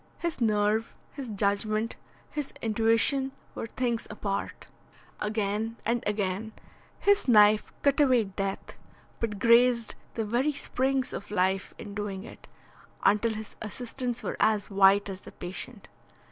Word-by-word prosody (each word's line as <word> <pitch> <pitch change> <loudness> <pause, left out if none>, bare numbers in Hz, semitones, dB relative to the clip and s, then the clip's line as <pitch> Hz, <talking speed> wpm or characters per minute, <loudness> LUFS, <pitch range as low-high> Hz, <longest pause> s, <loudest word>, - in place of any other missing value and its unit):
His 340 -6 -3
nerve, 215 0 +1 0.2
his 275 -4 -7
judgment, 215 +2 0 0.4
his 295 -2 -4
intuition, 230 +5 +2 0.2
were - - -5
things 235 -1 -2
apart. 200 -2 -4 0.5
Again 215 +1 -1
and 235 0 0
again 210 +1 -2 0.4
his 405 -4 +3
knife 210 -2 +6
cut 280 0 +3
away 255 -5 +5
death, 195 0 -5 0.4
but 220 -3 -2
grazed 235 +1 +4 0.2
the 225 - -1
very 250 +8 +1
springs 265 -1 -1
of - - -6
life 190 -1 0
in 205 - -8
doing 200 -2 -4
it, - - -12 0.6
until 220 +2 +3
his 215 0 -8
assistants 245 +2 -4
were - - -3
as 215 -1 +2
white 195 +1 +5
as 195 -1 -6
the - - -12
patient. 200 +4 -8
220 Hz, 130 wpm, -28 LUFS, 205-245 Hz, 0.6 s, knife